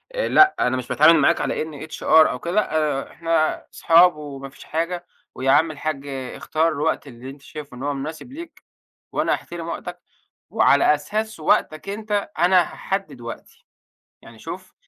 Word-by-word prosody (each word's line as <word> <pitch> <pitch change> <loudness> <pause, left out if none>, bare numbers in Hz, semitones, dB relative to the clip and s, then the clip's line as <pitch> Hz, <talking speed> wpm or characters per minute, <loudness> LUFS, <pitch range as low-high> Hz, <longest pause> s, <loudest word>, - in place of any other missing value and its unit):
لأ، 385 -6 +4
أنا 130 - +1
مش 125 -1 -5
باتعامل 160 +2 +5
معاك 140 - +3
على - - -1
إني 155 -2 -6
HR - - -9 0.3
أو 125 - -5
كده، 170 - -4
لأ 155 -8 0
إحنا 165 -1 0
اصحاب 170 0 +5
وما 140 -2 -8
فيش - - -15
حاجة، 175 +2 -3 0.3
ويا 135 +1 +1
عم 155 +3 +4
الحاج، 145 -1 -4
اختار 140 +4 -2
الوقت 145 -1 -1
اللي 125 +1 -10
أنت 140 +1 -12
شايفه 145 -4 -10
إن 130 - -7
هو 145 0 -1
مُناسِب 155 - -7
ليك، 330 +3 -10 0.5
وأنا - - +1
أحترم - - -6
وقتك، - - -6 0.5
وعلى 360 +2 +4
أساس 220 -3 -4
وقتك 155 +3 0
أنت 210 -1 -2
أنا 180 +1 +5
هاحدد 195 +3 -4
وقتي. 485 - -10 0.6
يعني - - -15
شوف - - -9
155 Hz, 160 wpm, -22 LUFS, 140-180 Hz, 0.6 s, باتعامل